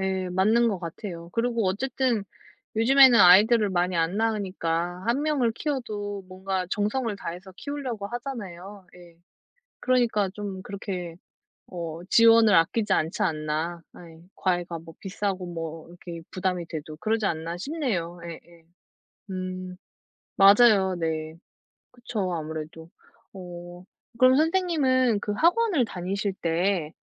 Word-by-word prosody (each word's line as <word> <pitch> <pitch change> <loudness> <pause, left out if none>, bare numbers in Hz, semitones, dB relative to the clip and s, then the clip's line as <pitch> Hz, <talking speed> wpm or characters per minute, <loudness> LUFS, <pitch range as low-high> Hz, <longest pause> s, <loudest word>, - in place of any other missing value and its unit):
예 190 -1 -1
맞는 220 +6 +3
것 195 -4 -2
같아요. 170 0 -7
그리고 230 -3 0
어쨌든 240 +1 0 0.5
요즘에는 260 +1 +7
아이들을 205 +4 +7
많이 180 0 0
안 165 +4 0
낳으니까 185 -5 -1
1 255 +5 +1
명을 275 -7 +1
키워도 210 -8 -4
뭔가 185 0 -3
정성을 215 +2 -1
다해서 185 +1 -8
키우려고 260 -8 -5
하잖아요. 205 -6 -7
예. 170 -2 -16 0.6
'그러니까 235 -6 +1
좀 200 -1 -6
그렇게 185 -4 -6 0.5
어 170 -2 -6
지원을 230 -2 +6
아끼지 190 +5 +3
않지 160 +2 0
않나.' 160 +1 -2 0.2
예. 165 -2 -14
'과외가 175 -2 -1
뭐 165 0 -13
비싸고 195 -1 -3
뭐 165 -1 -6
이렇게 170 -1 -9
부담이 180 -2 -2
돼도 155 -1 -7
그러지 220 +4 -1
않나.' 165 -1 -2
싶네요. 195 - -3
예예. 170 0 -11 0.6
음. 185 -1 -5 0.6
맞아요 195 -2 +6
네. 160 -1 -3 0.6
그쵸 235 -7 -4
아무래도. 160 +1 -6 0.4
어 175 -1 -10 0.3
그럼 255 +1 +6
선생님은 290 - +2
그 210 - -3
학원을 340 - +2
다니실 195 +1 -3
때 170 -1 0
190 Hz, 270 characters per minute, -26 LUFS, 175-230 Hz, 0.6 s, 요즘에는